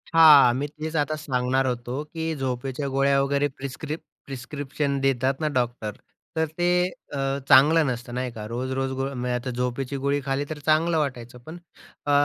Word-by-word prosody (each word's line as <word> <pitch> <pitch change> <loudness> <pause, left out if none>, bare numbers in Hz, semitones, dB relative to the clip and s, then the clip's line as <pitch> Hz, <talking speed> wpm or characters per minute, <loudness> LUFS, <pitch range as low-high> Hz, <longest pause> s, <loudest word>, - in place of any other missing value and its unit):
हां, 150 -6 +8
मी 140 +3 -2
तेच 155 +2 -6
आता 150 0 +1
सांगणार 130 -2 0
होतो, 125 +3 -3
की 160 +1 -4
झोपेच्या 135 +1 -3
गोळ्या 140 +1 +2
वगैरे 140 +1 +1
प्रिस्क्रिप 150 +4 -5 0.3
प्रिस्क्रिप्शन 140 +1 -3
देतात 135 0 +2
ना 155 - 0
डॉक्टर, 120 -3 -1 0.4
तर 160 0 +2
ते 175 0 +1 0.5
अ, 140 - -3 0.3
चांगलं 150 +4 +7
नसतं 120 -1 -4
नाही 125 -1 -2
का, 110 -2 -7
रोज-रोज 130 +3 -2
गो 135 0 -2
म्हणजे 125 -1 -2
आता 125 +1 -3
झोपेची 125 +2 -2
गोळी 140 +1 0
खाल्ली 135 +1 -1
तर 155 -1 -5
चांगलं 160 +2 +3
वाटायचं, 125 -5 -3
पण 165 +2 -8 0.5
अ, 145 - +1
135 Hz, 165 wpm, -25 LUFS, 125-150 Hz, 0.5 s, हां